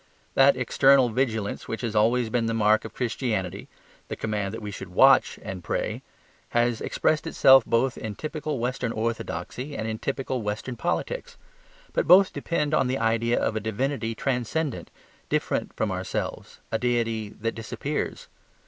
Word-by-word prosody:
That 135 +1 +5
external 130 +1 +4
vigilance 110 -4 -1
which 115 - -4
has 115 -3 -3
always 115 +2 +2
been 120 -2 +1
the 115 - -1
mark 110 0 +3
of 110 - -8
Christianity 110 -6 -2 0.4
(the - - -4
command 105 -3 -2
that 115 - -6
we 105 -2 -6
should 95 -2 -8
WATCH 135 +9 +5
and 95 -2 -6
pray) - - -2 0.6
has 120 -1 +2
expressed 155 +1 0
itself 135 -5 +6
both 125 +2 +1
in 110 -2 -5
typical 155 0 -4
western 125 0 -2
orthodoxy 115 - -4
and 110 - -3
in 110 -1 -3
typical 135 -2 -2
western 105 +4 -4
politics: 485 - -3 0.6
but - - 0
both 190 +1 +7
depend 150 -3 -1
on 135 - +3
the 130 +1 0
idea 115 +1 +1
of - - 0
a - - 0
divinity 115 +2 -2
transcendent, 135 +4 -2 0.4
different - - -1
from - - -1
ourselves, - - -4
a 110 - 0
deity 115 -3 0
that 115 +1 -1
disappears. 115 -1 -4
115 Hz, 155 wpm, -26 LUFS, 110-135 Hz, 0.6 s, both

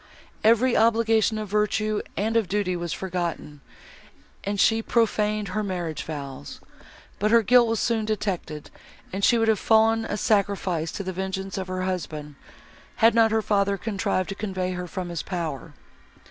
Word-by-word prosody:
—Every 235 +3 +4
obligation 225 -1 +3
of 215 -1 -4
virtue 210 +1 0 0.2
and 220 +3 0
of 225 -4 +2
duty 195 -1 -1
was 170 -1 -4
forgotten, 170 -6 -4 0.8
and 200 0 -2
she 225 +3 +4
prophaned 215 -3 0
her 215 +4 -2
marriage 175 -6 -3
vows; 140 - -7 0.6
but 210 - +2
her 230 0 +5
guilt 245 +3 +5
was 225 -1 0
soon 230 -2 0
detected, 195 -8 -3 0.4
and 195 +1 -3
she 240 - +5
would 225 -1 +1
have 220 -3 +3
fallen 225 0 +3
a 205 - -3
sacrifice 195 -6 0
to 200 - -4
the 185 0 -4
vengeance 190 +1 -4
of 190 -1 -4
her 185 0 -3
husband, 155 -5 -4 0.6
had 225 0 +5
not 225 -1 +5
her 220 0 +1
father 200 -1 +1
contrived 195 -3 -2
to - - -2
convey 190 -3 -3
her 180 0 -5
from 180 0 -5
his 170 -2 -3
power. 165 -7 -5
200 Hz, 165 wpm, -25 LUFS, 180-220 Hz, 0.8 s, her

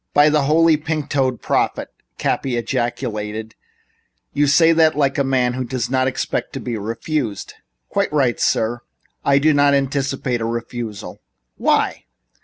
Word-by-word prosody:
"By 145 +1 +6
the 150 -2 +2
Holy 160 +2 +4
Pink 155 -1 -3
toed 130 -4 0
Prophet!" - - 0 0.3
Cappy 130 -3 -1
ejaculated, 110 -2 -3 0.8
"you 145 +1 +2
say 165 +4 +5
that 160 -2 +3
like 140 -1 +1
a - - +3
man 130 -2 +1
who 130 +1 -3
doesn't 125 0 -3
expect 130 0 -1
to - - -4
be 120 - -4
refused." 115 +1 -3 0.3
"Quite - - -1
right, 135 -5 +1
sir. 120 +2 0 0.4
I 140 0 +4
do 155 +2 +4
not 145 0 +4
anticipate 135 -3 -1
a - - -1
refusal." 115 -2 -5 0.4
"Why?" - - +1
130 Hz, 145 wpm, -20 LUFS, 120-145 Hz, 0.8 s, By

